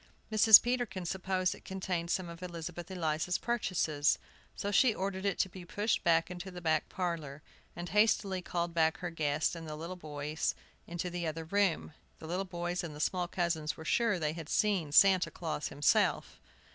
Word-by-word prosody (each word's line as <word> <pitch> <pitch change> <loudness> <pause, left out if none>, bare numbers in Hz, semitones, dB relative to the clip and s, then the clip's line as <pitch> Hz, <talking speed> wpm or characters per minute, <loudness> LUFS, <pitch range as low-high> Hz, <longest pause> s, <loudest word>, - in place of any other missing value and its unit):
Mrs. 215 0 +9
Peterkin 240 -7 -2
supposed 185 0 -1
it - - -14
contained 185 -3 -3
some 185 0 -1
of 170 +1 -10
Elizabeth 175 0 -6
Eliza's 170 -1 -1
purchases, 180 -10 +1 0.4
so 200 - -3
she 230 +1 +4
ordered 190 0 -3
it 200 - 0
to - - +2
be 185 0 -10
pushed 205 +5 -1
into 175 +3 +1
the 180 -1 -8
back 160 -3 0
parlor, 160 -6 -4 0.3
and 175 +1 -6
hastily 200 -2 +2
called 175 -1 -3
back 160 -1 +2
her 175 -1 -5
guests 155 -2 0
and 165 -2 -7
the 150 - -5
little 165 +4 -6
boys 150 -2 -3 0.3
into 175 +1 -4
the 175 -1 -3
other 160 +1 -4
room. 195 -3 0 0.2
The - - -11
little 180 +4 -2
boys 175 -1 -3
and 160 -3 -6
the - - -9
small 180 +3 0
cousins 170 -4 -1
were 160 - -9
sure 230 +2 +2
they 155 -2 -1
had 165 -2 -8
seen 195 -8 +1
Santa 185 +3 +6
Claus 160 -3 -4
himself. 145 0 +1
175 Hz, 180 wpm, -32 LUFS, 160-190 Hz, 0.4 s, Mrs